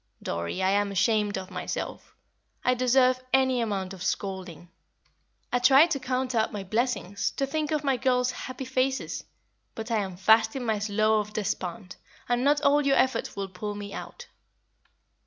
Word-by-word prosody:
"Dorrie, 85 - -3
I 190 - +3
am 200 0 +1
ashamed 205 +1 +1
of 185 -1 -7
myself. - - -5 0.5
I 250 - +4
deserve 255 0 +3
any 260 -2 +3
amount 195 -4 -2
of 190 - -11
scolding. 185 -4 -4 0.8
I 245 - +3
try 270 +5 +7
to 335 -5 -2
count 255 0 -2
up 225 -2 +1
my 205 -2 -5
blessings, 205 -2 -1
to 275 - +1
think 300 +2 -2
of 305 -1 -1
my 270 -3 +1
girls' 250 0 +1
happy 255 +1 -6
faces, 260 +1 -1 0.5
but 225 +1 -6
I 225 - +2
am 190 -4 -3
fast 220 +4 +4
in 260 -2 -3
my 220 -2 0
Slough 215 0 +1
of 210 - -16
Despond, 195 -1 -3 0.3
and 245 0 +1
not 290 +1 +3
all 290 0 +4
your 275 -1 +3
efforts 260 -3 +1
will 195 -1 -3
pull 205 +3 -5
me 205 -1 -7
out." 485 - -8
225 Hz, 175 wpm, -27 LUFS, 200-260 Hz, 0.8 s, try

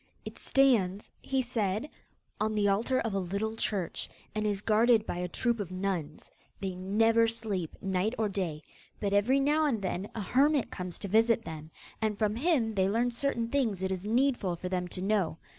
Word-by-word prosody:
'It - - -8
stands,' 215 -8 +2
he 265 -1 0
said, 220 0 -1 0.5
'on 215 0 0
the 210 -1 +2
altar 225 +6 +2
of 225 -3 -2
a 195 - +1
little 200 +4 -2
church, 200 -6 -2 0.2
and 215 0 -1
is 205 -2 0
guarded 225 0 +4
by - - -3
a 180 0 -2
troop 235 +5 -1
of 200 -4 -3
nuns. 185 -5 -4 0.3
They 190 -1 -3
never 225 +5 +3
sleep, 210 -7 -2
night 195 +4 0
or 220 - +1
day, 180 -6 -3 0.4
but 200 -1 -1
every 230 +7 +4
now 300 +3 +3
and 240 -7 0
then 190 0 -3
a 225 - -3
hermit 275 +7 +2
comes 180 -2 -5
to 200 - -4
visit 225 +3 +3
them, 155 -1 -7 0.3
and 215 -2 0
from 215 -1 +1
him 250 -5 +1
they 190 -2 +2
learn 235 +4 +1
certain 235 -1 -1
things 230 -9 0
it 190 - 0
is 185 -1 -3
needful 230 -4 +1
for 180 +2 -5
them 180 -1 -1
to 185 +1 -4
know. 195 -6 +1
210 Hz, 195 wpm, -30 LUFS, 190-230 Hz, 0.5 s, guarded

